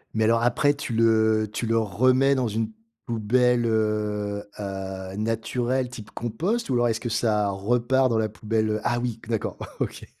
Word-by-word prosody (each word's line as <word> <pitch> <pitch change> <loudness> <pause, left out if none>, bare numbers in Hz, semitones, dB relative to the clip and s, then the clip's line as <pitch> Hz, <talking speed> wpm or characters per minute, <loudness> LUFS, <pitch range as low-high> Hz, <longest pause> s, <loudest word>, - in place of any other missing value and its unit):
Mais 110 - +2
alors, 115 +1 +3
après, 145 +4 +3
tu 140 -4 -5
le 110 -1 +3
tu 120 - -2
le 115 0 +2
remets 130 +6 +3
dans 130 -2 0
une 110 +1 -2 0.3
poubelle, 120 +2 +2
heu 105 -2 -1 0.2
heu, 95 -1 -5
naturelle, 120 +3 -1
type 110 -4 -10
compost 165 - -2
ou 130 - +1
alors 120 0 +3
est-ce 115 -1 0
que 120 - -4
ça 105 -3 +1
repart 120 +6 +1
dans 115 - +1
la 110 -1 +1
poubelle, 110 +1 -1
heu 110 0 -1
ah 120 0 +1
oui, 120 -2 -3
d'accord, 115 -2 -2 0.2
OK. - - -3
115 Hz, 175 wpm, -25 LUFS, 105-120 Hz, 0.3 s, alors